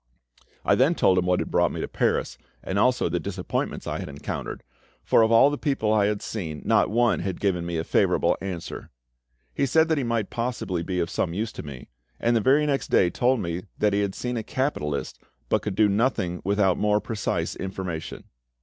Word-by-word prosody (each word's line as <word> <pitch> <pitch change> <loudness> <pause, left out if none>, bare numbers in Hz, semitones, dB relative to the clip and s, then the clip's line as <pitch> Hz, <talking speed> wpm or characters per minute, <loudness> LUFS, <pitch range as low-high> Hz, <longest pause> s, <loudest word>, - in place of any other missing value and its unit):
I - - +4
then 140 +7 +3
told 95 - +4
him 90 - -1
what 90 0 +3
had - - -3
brought - - +3
me - - -5
to - - -2
Paris, - - -1 0.2
and 95 +1 -1
also 125 +3 +3
the - - -1
disappointments - - -3
I - - -3
had - - -6
encountered, 70 0 -6 0.4
for - - +4
of 110 0 +3
all 115 +5 +6
the 145 - -3
people 135 -8 0
I 105 -2 +3
had 105 -1 -2
seen 80 -9 -5
not - - +3
one 120 +2 +2
had 95 0 -3
given 90 -4 0
me 85 -1 -2
a 80 - -1
favourable - - +2
answer. 90 -4 -6 0.6
He 140 - 0
said 160 +3 +3
that 160 -2 +2
he - - -1
might 115 -3 -1
possibly 115 -7 -2
be 90 +1 -2
of 85 -1 -1
some 85 -2 -1
use 110 +2 -2
to - - -7
me, 70 -4 -9 0.3
and 120 0 +2
the 115 - +3
very 140 +7 +4
next 140 -2 0
day 90 - +3
told 125 -1 +1
'me 85 +1 -4
that 105 -1 +2
he 100 - +2
had 100 -2 -2
seen 125 -1 -3
a 110 - -3
capitalist, 90 - -2 0.3
but - - +2
could 105 -3 -4
do 110 - +4
nothing 100 -4 0
without 100 -1 +2
more 105 0 +3
precise 110 -1 -2
information. 95 -4 -5
105 Hz, 215 wpm, -25 LUFS, 90-120 Hz, 0.6 s, all